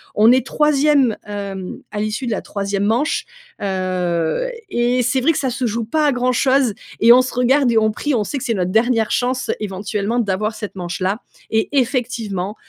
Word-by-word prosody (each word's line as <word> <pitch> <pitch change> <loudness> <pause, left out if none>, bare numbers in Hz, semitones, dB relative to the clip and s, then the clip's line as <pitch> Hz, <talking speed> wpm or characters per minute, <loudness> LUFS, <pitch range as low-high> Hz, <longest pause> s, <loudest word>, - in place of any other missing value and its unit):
On 220 +3 +6
est 260 0 +3
3e, 290 -5 +3
hem, 200 -3 -6
à 210 - -4
l'issue 215 +4 -2
de 235 - -2
la 210 - -1
3e 200 0 -3
manche, 240 +8 0 0.4
heu 185 - -1 0.2
et 245 -1 +1
c'est 255 +2 +1
vrai 325 +6 +4
que - - -3
ça 265 - 0
se 255 +1 -2
joue 230 0 -1
pas 305 +6 +1
à - - +4
grand 250 0 +1
chose 260 -3 +2 0.3
et 235 +1 +8
on 255 - +6
se 255 - -4
regarde 250 +1 +3
et 230 - +2
on 220 0 +3
prie. 290 +6 -2
On 215 - +1
sait 280 - -4
que 265 - -5
c'est 235 - 0
notre 185 -3 -1
dernière 225 0 +2
chance, 255 +1 -1
éventuellement, 205 +3 -2
d'avoir 210 0 -1
cette 210 -2 -7
manche-là 185 +3 -2 0.3
et 220 0 0
effectivement, 225 -6 -2
225 Hz, 200 wpm, -19 LUFS, 200-255 Hz, 0.4 s, et